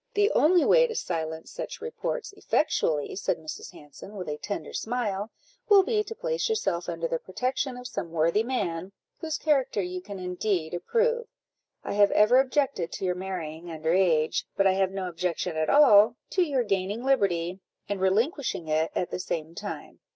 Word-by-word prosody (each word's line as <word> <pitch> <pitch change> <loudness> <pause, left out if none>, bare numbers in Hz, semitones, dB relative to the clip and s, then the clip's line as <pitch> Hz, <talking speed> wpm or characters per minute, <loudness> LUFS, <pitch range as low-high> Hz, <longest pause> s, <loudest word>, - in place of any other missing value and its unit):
"The 410 +2 +3
only 345 +2 +4
way - - +6
to 455 - -6
silence 160 -2 -3
such - - -6
reports 470 -1 -4
effectually," 160 - 0
said 190 - -1
Mrs. 155 -1 -8
Hanson, 150 +8 -13
with 185 -3 -6
a 150 - -3
tender 200 - -5
smile, 220 -3 -2 0.4
"will 400 -2 +8
be 430 0 +1
to 450 - -7
place - - -1
yourself 175 - -1
under 165 -1 -2
the 165 - -2
protection 250 - -2
of 250 - -9
some 170 - -5
worthy 165 +5 +2
man, 195 -7 -3 0.3
whose 315 -2 -3
character 275 -8 +1
you 180 -1 -3
can 200 +1 -8
indeed 180 -2 -2
approve. 470 - 0 0.6
I - - -3
have 205 0 +5
ever 215 +5 +6
objected 265 - 0
to - - -4
your 180 - +1
marrying 175 -3 -6
under 160 0 -1
age, 165 -5 +2
but 195 - +3
I 190 - +6
have 190 0 +2
no 190 -1 -4
objection 175 0 -2
at 155 0 0
all 230 -6 +7 0.2
to 375 - +2
your 280 -7 +1
gaining 200 +2 -1
liberty, 190 -9 +1 0.3
and 200 -2 -3
relinquishing 220 - 0
it 155 +1 +1
at 180 - -1
the - - -3
same 165 -2 -4
time. 205 +4 -7
195 Hz, 180 wpm, -27 LUFS, 170-265 Hz, 0.6 s, will